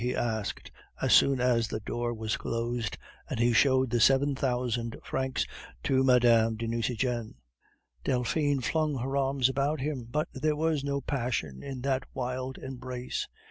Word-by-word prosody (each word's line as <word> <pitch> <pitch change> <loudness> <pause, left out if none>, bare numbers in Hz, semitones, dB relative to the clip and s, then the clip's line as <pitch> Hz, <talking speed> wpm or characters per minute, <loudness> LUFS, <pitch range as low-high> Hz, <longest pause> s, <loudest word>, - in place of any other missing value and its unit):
he 125 +1 0
asked, 110 -3 -2 0.3
as - - +2
soon 135 -2 +6
as 120 -2 +2
the 110 - -3
door 120 +3 -2
was 110 -2 -2
closed, 115 -1 -2 0.3
and - - -3
he 120 0 +3
showed 130 +2 +4
the 120 - +2
seven 135 +4 +4
thousand 125 -3 -1
francs 130 -1 -1 0.4
to 130 -1 +3
Mme. 120 -3 +5
de 115 +1 -3
Nucingen. 115 0 -1 0.7
Delphine 140 +3 +1
flung 155 +2 0
her 135 +2 -2
arms 135 -2 +2
about 140 +3 0
him, 130 -4 -3
but 150 +5 0
there 150 +3 0
was 155 -2 0
no 140 0 -1
passion 120 - -2
in 135 -2 -6
that 135 0 +1
wild 130 0 -3
embrace. 130 -1 -5
125 Hz, 155 wpm, -29 LUFS, 120-135 Hz, 0.7 s, soon